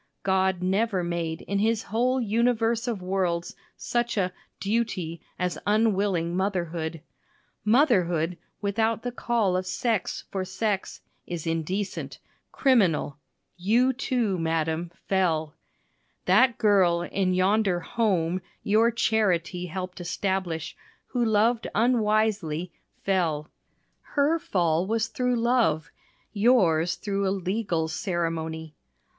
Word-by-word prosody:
God 190 Hz, -1 st, +1 dB
never 195 Hz, 0 st, +1 dB
made 170 Hz, -2 st, -3 dB
in 200 Hz, 0 st, -1 dB
his 220 Hz, +1 st, +1 dB
whole 250 Hz, +4 st, +1 dB
universe 230 Hz, +1 st, +1 dB
of 215 Hz, -6 st, -3 dB
worlds 180 Hz, -2 st, -1 dB, 0.2 s
such 240 Hz, -1 st, -1 dB
a 185 Hz, -2 st, 0 dB, 0.3 s
"duty" 195 Hz, -6 st, -2 dB, 0.2 s
as 180 Hz, -1 st, -2 dB
unwilling 200 Hz, -5 st, +2 dB
motherhood. 170 Hz, -4 st, -2 dB, 0.6 s
Motherhood 180 Hz, -, +3 dB, 0.3 s
without 220 Hz, +2 st, 0 dB
the 245 Hz, -, -2 dB
call 230 Hz, -6 st, 0 dB
of 185 Hz, 0 st, -1 dB
sex 210 Hz, +2 st, -1 dB
for 190 Hz, -1 st, -2 dB
sex 190 Hz, +1 st, -2 dB, 0.3 s
is 170 Hz, -3 st, -5 dB
indecent 165 Hz, +5 st, -3 dB, 0.3 s
criminal. 190 Hz, -, +2 dB, 0.4 s
You, 235 Hz, +8 st, +3 dB
too, 240 Hz, -7 st, -1 dB
madam, 165 Hz, +1 st, -1 dB, 0.2 s
fell. 165 Hz, -5 st, +1 dB, 0.7 s
That 255 Hz, -3 st, +4 dB
girl 185 Hz, -6 st, +3 dB
in 185 Hz, 0 st, 0 dB
yonder 190 Hz, -1 st, +2 dB
"home" 185 Hz, -5 st, 0 dB, 0.2 s
your 220 Hz, +3 st, +4 dB
"charity" 180 Hz, -7 st, 0 dB
helped 185 Hz, +1 st, -6 dB
establish, 180 Hz, -2 st, -2 dB, 0.3 s
who 245 Hz, -2 st, 0 dB
loved 225 Hz, +1 st, +2 dB
unwisely, 215 Hz, -8 st, +1 dB, 0.3 s
fell. 165 Hz, -6 st, 0 dB, 0.5 s
Her 295 Hz, +4 st, +1 dB
fall 175 Hz, -, +1 dB
was 225 Hz, +2 st, 0 dB
through 250 Hz, -1 st, 0 dB
love 230 Hz, -11 st, +1 dB, 0.4 s
yours 185 Hz, -7 st, +3 dB
through 200 Hz, -1 st, -2 dB
a -, -, +2 dB
legal 190 Hz, -3 st, -1 dB
ceremony. 160 Hz, -3 st, -3 dB
190 Hz, 110 wpm, -26 LUFS, 170-225 Hz, 0.7 s, That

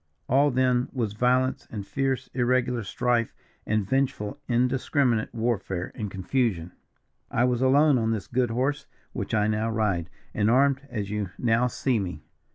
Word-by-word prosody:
All 140 Hz, +3 st, +4 dB
then 125 Hz, -1 st, +2 dB
was 115 Hz, -6 st, -2 dB
violence, 125 Hz, +3 st, +1 dB
and 105 Hz, -3 st, -6 dB
fierce, 135 Hz, +1 st, -1 dB
irregular 125 Hz, -1 st, +1 dB
strife, 120 Hz, +3 st, 0 dB, 0.3 s
and 110 Hz, -3 st, 0 dB
vengeful 135 Hz, -1 st, -1 dB
indiscriminate 125 Hz, -1 st, +1 dB
warfare 110 Hz, -6 st, -2 dB
and 105 Hz, -4 st, -4 dB
confusion. 95 Hz, -3 st, -1 dB, 0.6 s
"I 120 Hz, -, +1 dB
was 125 Hz, -1 st, +1 dB
alone 140 Hz, +1 st, +4 dB
on 110 Hz, -1 st, 0 dB
this 110 Hz, -4 st, -2 dB
good 120 Hz, +2 st, 0 dB
horse 130 Hz, +5 st, -1 dB, 0.3 s
which -, -, -3 dB
I 105 Hz, -1 st, +3 dB
now 110 Hz, +1 st, 0 dB
ride, 100 Hz, -7 st, 0 dB, 0.2 s
and 105 Hz, 0 st, +1 dB
armed 135 Hz, +2 st, +3 dB
as 105 Hz, -3 st, -4 dB
you 105 Hz, -3 st, -2 dB
now 120 Hz, +1 st, +2 dB
see 125 Hz, -1 st, 0 dB
me. 90 Hz, -6 st, -5 dB
120 Hz, 155 wpm, -26 LUFS, 105-130 Hz, 0.6 s, All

